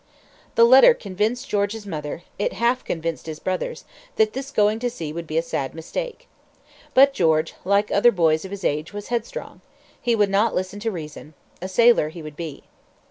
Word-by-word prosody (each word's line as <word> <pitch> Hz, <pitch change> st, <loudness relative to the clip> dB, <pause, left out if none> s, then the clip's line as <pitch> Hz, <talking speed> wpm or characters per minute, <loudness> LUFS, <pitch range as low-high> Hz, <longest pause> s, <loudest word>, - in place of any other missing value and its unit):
The 230 Hz, -, +6 dB
letter 265 Hz, -, +8 dB
convinced 210 Hz, +5 st, -2 dB
George's 205 Hz, +1 st, -1 dB
mother 155 Hz, -2 st, -5 dB, 0.2 s
it 205 Hz, -, 0 dB
half 240 Hz, +3 st, +1 dB
convinced 165 Hz, -1 st, -4 dB
his 155 Hz, -1 st, -5 dB
brothers 190 Hz, -, -3 dB, 0.3 s
that 435 Hz, -1 st, +2 dB
this 270 Hz, +1 st, -5 dB
going 215 Hz, -4 st, +2 dB
to 245 Hz, +1 st, -1 dB
sea 165 Hz, -11 st, -6 dB
would 170 Hz, 0 st, -6 dB
be 155 Hz, -, -3 dB
a 165 Hz, -, +2 dB
sad 135 Hz, -5 st, -3 dB
mistake. -, -, -6 dB, 0.7 s
But 275 Hz, +1 st, +7 dB
George, 160 Hz, -7 st, +2 dB
like 200 Hz, +2 st, +1 dB
other 225 Hz, +4 st, +5 dB
boys 160 Hz, -5 st, +2 dB
of 190 Hz, -, -7 dB
his 200 Hz, 0 st, -7 dB
age, 150 Hz, +5 st, -1 dB
was 205 Hz, 0 st, -7 dB
headstrong. 240 Hz, -, -4 dB, 0.4 s
He 240 Hz, -1 st, +2 dB
would 205 Hz, -2 st, +2 dB
not 210 Hz, +3 st, +2 dB
listen 185 Hz, +2 st, -3 dB
to 225 Hz, +2 st, -2 dB
reason. 155 Hz, -3 st, -9 dB, 0.3 s
A 185 Hz, -, -4 dB
sailor 230 Hz, -4 st, +4 dB
he 165 Hz, 0 st, -10 dB
would 155 Hz, -1 st, -9 dB
be. 160 Hz, -3 st, -7 dB
200 Hz, 190 wpm, -23 LUFS, 165-235 Hz, 0.7 s, letter